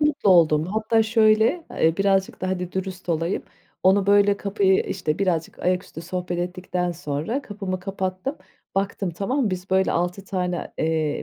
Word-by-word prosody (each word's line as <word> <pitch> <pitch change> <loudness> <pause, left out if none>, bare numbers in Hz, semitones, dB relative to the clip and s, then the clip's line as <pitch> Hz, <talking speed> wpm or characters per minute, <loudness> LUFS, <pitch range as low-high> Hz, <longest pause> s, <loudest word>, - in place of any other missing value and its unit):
mutlu 295 -9 +2
oldum. 160 -3 +5
Hatta 220 +3 +2
şöyle, 220 +7 +3
eee, 160 0 +2
birazcık 195 -1 +1
da 185 - -2
hadi 180 -1 -3
dürüst 190 -1 -5
olayım. 165 +2 0 0.4
Onu 195 +1 +4
böyle 205 0 +5
kapıyı 200 -1 +2
işte 165 -4 -2
birazcık 175 -5 -1
ayaküstü 180 -2 -2
sohbet 180 0 -3
ettikten 180 0 -2
sonra 160 - -3
kapımı 195 -5 -5
kapattım. 190 +7 -3 0.4
Baktım 195 -1 -1
tamam 225 - -1
mı? 210 - 0
Biz 185 +1 -5
böyle 190 0 +3
6 180 +3 -1
tane, 180 -3 -3
eee, 155 -2 0
185 Hz, 155 wpm, -23 LUFS, 175-200 Hz, 0.4 s, oldum